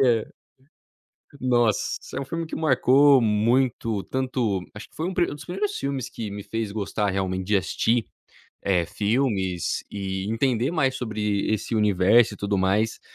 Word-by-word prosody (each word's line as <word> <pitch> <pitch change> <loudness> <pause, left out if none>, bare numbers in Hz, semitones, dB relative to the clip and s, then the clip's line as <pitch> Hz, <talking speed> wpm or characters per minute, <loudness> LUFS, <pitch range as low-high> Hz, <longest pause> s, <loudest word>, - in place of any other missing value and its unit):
É. 120 -4 +3 1.2
Nossa, 120 -4 +3 0.4
é - - -2
um - - -5
filme 165 +5 -4
que 160 - -6
marcou 140 -1 +5
muito 115 -1 +1
tanto, 125 -7 -1
acho 105 - -9
que - - -25
foi 160 - -3
um, - - -2
um 175 -4 +1
dos - - -10
primeiros 195 +4 -3
filmes 135 -2 -3
que 110 -3 -6
me 100 0 -6
fez 115 -2 -3
gostar 105 0 -1
realmente 95 -1 -2
de 105 +1 +3
assistir, 110 +5 0 0.6
eh, 90 -3 +1
filmes 100 -4 -1
e 95 0 -4
entender 120 +2 +1
mais 135 -6 +1
sobre 105 -4 -2
esse 110 +2 -2
universo 105 +2 +4
e - - -10
tudo 100 0 -1
mais. 100 +4 +1
110 Hz, 160 wpm, -24 LUFS, 100-130 Hz, 1.2 s, marcou